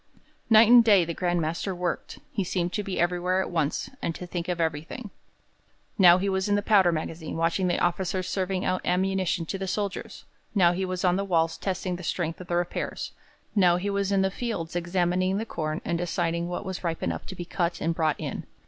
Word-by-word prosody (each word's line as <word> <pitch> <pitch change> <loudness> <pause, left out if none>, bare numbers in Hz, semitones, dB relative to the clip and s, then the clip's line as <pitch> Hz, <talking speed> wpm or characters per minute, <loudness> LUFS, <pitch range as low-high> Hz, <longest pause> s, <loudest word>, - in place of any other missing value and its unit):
Night 220 0 +8
and 240 0 +8
day 200 -6 +5
the 170 - -3
Grand 175 0 0
Master 170 +4 -2
worked; 175 -1 -3
he 200 - -1
seemed 180 -1 -2
to 210 - 0
be 195 -2 -4
everywhere 180 +1 +1
at 190 - -2
once, 160 -4 0
and 165 - -2
to 180 - -7
think 175 -1 -4
of 175 -1 -1
everything. 165 +8 -3 0.8
Now 180 -3 +7
he 190 +2 -1
was 190 +1 0
in 205 - +3
the 205 - 0
powder 195 -5 +5
magazine 160 0 -4
watching 165 +3 +1
the 175 - +1
officers 185 +1 0
serving 185 -1 -1
out 185 0 0
ammunition 185 -1 0
to 195 +4 -4
the 195 - -3
soldiers; 200 +1 -4 0.3
now 175 -3 +5
he 190 +2 -1
was 185 0 -2
on 180 0 +3
the 200 - 0
walls 165 -4 +1
testing 185 -2 -3
the - - -9
strength 165 0 -2
of 180 - -10
the 175 - -1
repairs; 175 0 -2 0.4
now 180 -4 +5
he 200 +3 -2
was 200 0 0
in 195 -1 +3
the 190 - +1
fields 195 -8 -4
examining 180 +2 +1
the 220 - -2
corn 155 -6 -3
and 170 - -1
deciding 170 -1 -1
what 175 - -4
was 190 -1 -5
ripe 165 -2 -2
enough - - -3
to 190 - -7
be 175 - -6
cut 175 -1 -1
and 165 - 0
brought 160 -2 0
in. - - -5
180 Hz, 220 wpm, -26 LUFS, 170-190 Hz, 0.8 s, Night